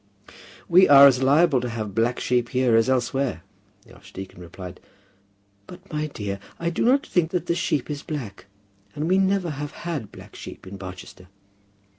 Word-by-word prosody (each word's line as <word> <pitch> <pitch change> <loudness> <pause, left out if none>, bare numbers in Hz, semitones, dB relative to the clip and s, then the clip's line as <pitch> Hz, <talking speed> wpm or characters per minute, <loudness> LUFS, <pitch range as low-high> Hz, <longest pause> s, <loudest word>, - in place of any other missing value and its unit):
"We 185 0 +6
are 140 -1 +10
as 130 -2 +5
liable 140 0 +4
to 125 - -3
have 110 -3 -5
black 115 +3 0
sheep 120 -1 0
here 125 -3 +2
as 115 +2 +3
elsewhere," 130 -4 -1 0.4
the - - -17
archdeacon 95 -2 -11
replied. 90 +1 -10 0.9
"But, 180 0 -13
my 150 0 -1
dear, 100 -8 -5 0.2
I 170 0 -1
do - - -1
not 265 +4 +3
think 170 -3 +1
that 175 -1 -2
the 170 - 0
sheep 150 -5 -1
is 145 -1 -5
black; 120 -12 -7 0.5
and 150 +2 -2
we 185 +2 +3
never 190 -3 +1
have 145 0 -6
had 150 -11 -4
black - - -14
sheep - - -10
in 95 +1 -9
Barchester." 90 0 -10
135 Hz, 175 wpm, -24 LUFS, 110-170 Hz, 0.9 s, are